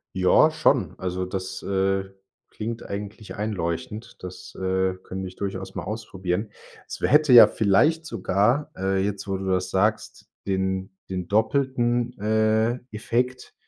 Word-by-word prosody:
Ja, 90 -1 +5
schon. - - +1
Also 90 0 -3
das, 95 0 -5
äh, 95 0 0 0.4
klingt 115 +2 -5
eigentlich 100 +1 -7
einleuchtend, 105 +3 -4
das, 90 0 -9
äh, 95 0 0
könnte 95 0 -5
ich 90 - -11
durchaus 95 -1 -5
mal - - -4
ausprobieren. 100 -2 -3 0.4
Es - - -7
wär - - +1
hätte 150 -3 +5
ja 120 - +12
vielleicht 150 +11 +2
sogar, 120 +3 +1
äh,- 95 0 0
jetzt, 100 0 -3
wo 95 -1 -1
du 95 - -6
das 90 0 0
sagst- 105 +3 -1 0.2
den 95 0 -1 0.2
den 90 -2 -4
doppelten, 120 +2 +1
äh, 110 +3 +2
Effekt, 125 +4 -2
100 Hz, 140 wpm, -24 LUFS, 95-115 Hz, 0.4 s, ja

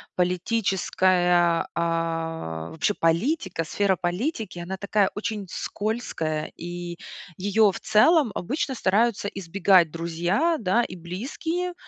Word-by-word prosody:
Политическая 180 -2 +2
а, 165 - -2
вообще 160 +6 0
политика, 170 - 0
сфера 195 +4 +1
политики- 185 - -3
она 185 +3 -5
такая 200 0 +1
очень 210 -1 -4
скользкая, 180 -9 -3
и 175 0 -6 0.4
ее 205 +2 +3
в - - -7
целом 275 +3 +4
обычно 265 - -2
стараются 210 0 +1
избегать 190 -2 +3
друзья, 175 - 0
да, 220 +3 +2
и 185 - -6
близкие, 275 - -4
185 Hz, 105 wpm, -25 LUFS, 170-220 Hz, 0.4 s, целом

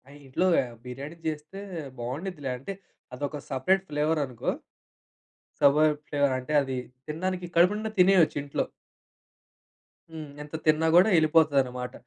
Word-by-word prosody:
ఆ! - - -16 0.2
ఇంట్లో 135 +7 0 0.2
ఆ - - -4 0.2
బిర్యానీ 140 +6 -7
చేస్తే 155 +5 -5 0.4
బాగుండుద్దిలే 145 +3 -4
అంటే 135 +10 -6 0.4
అదొక 145 +3 -4
సపరేట్ 185 +9 +1
ఫ్లేవరనుకో. 150 -4 0 1.1
సబర్ 150 +2 +5
ఫ్లేవర్ 145 -2 +1
అంటే 130 +4 -5
అది 135 -1 -3 0.3
తినడానికి 180 +4 -3
కడుపు 175 +4 +5
నిండా 220 +1 -3
తినేయొచ్చు 180 -4 +5
ఇంట్లో. 140 - -2 1.4
హ్మ్. 160 -2 -8
ఎంత 150 +1 -9
తిన్నా 155 +1 +3
కూడా 185 +5 +7
యేళ్ళిపోతుందనమాట. 140 -6 +2
150 Hz, 120 wpm, -27 LUFS, 135-170 Hz, 1.4 s, కూడా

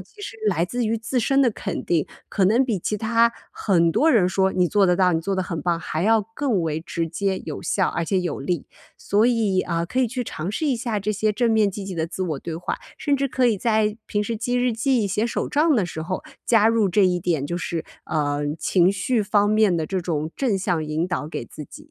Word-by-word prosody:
其 415 - -14
实 225 - -7
来 175 -5 +2
自 240 +5 -2
于 225 - 0
自 225 +3 -2
身 270 +3 +3
的 250 - +4
肯 200 -2 -5
定， 165 -4 +1 0.2
可 195 - +1
能 225 +8 +4
比 230 -6 -1
其 210 +4 -2
他 230 +2 +2 0.2
很 170 -5 +2
多 245 - +3
人 215 - +4
说 190 +1 +1
你 180 -1 +2
做 200 0 +3
得 180 - +4
到， 180 -1 +3
你 160 - +1
做 195 +4 -2
得 185 - 0
很 165 -5 -4
棒 170 -1 0
还 160 0 -3
要 220 +3 +4
更 250 -10 0
为 160 -2 -1
直 165 0 -3
接 190 +3 -1
有 - - -5
效 190 - +1
而 170 - -2
且 190 +2 +1
有 175 -4 -3
力。 165 +2 -2 0.3
所 210 +3 +2
以， 220 -6 +2
啊， 170 -1 -1
可 250 +9 -4
以 255 - +3
去 250 +2 -3
尝 170 -5 -5
试 310 - -1
一 270 -4 +1
下 230 -3 -2
这 210 +2 -1
些 215 +1 0
正 235 +2 +1
面 215 -2 +3
积 195 +1 -6
极 190 - -5
的 160 -1 -1
自 185 +3 -5
我 155 -6 -2
对 165 +3 -6
话， 170 +2 -3 0.2
甚 290 -3 +1
至 275 0 0
可 255 0 +2
以 230 -3 +2
在 215 0 +1
平 205 0 -1
时 225 +2 -3
记 245 +3 -2
日 245 -1 +2
记、 235 -1 +1
写 210 +3 0
手 235 - -2
账 305 +1 +3
的 210 -6 +2
时 160 -1 -6
候 185 +3 -4 0.2
加 225 -2 +5
入 225 -3 +2
这 195 +2 +3
一 180 -1 +2
点， 160 -5 0
就 175 - -3
是， 170 -2 -3 0.2
呃， 145 -2 -1 0.2
情 180 -1 +3
绪 215 +4 0
方 205 0 +2
面 215 -4 +3
的 160 -2 -1
这 190 -1 -2
种 160 -3 -2
正 235 -8 +1
向 175 -4 -1
引 155 +3 -1
导 175 -5 -2
给 140 - -5
自 150 - -9
己。 - - -14
200 Hz, 270 characters per minute, -23 LUFS, 175-230 Hz, 0.3 s, 加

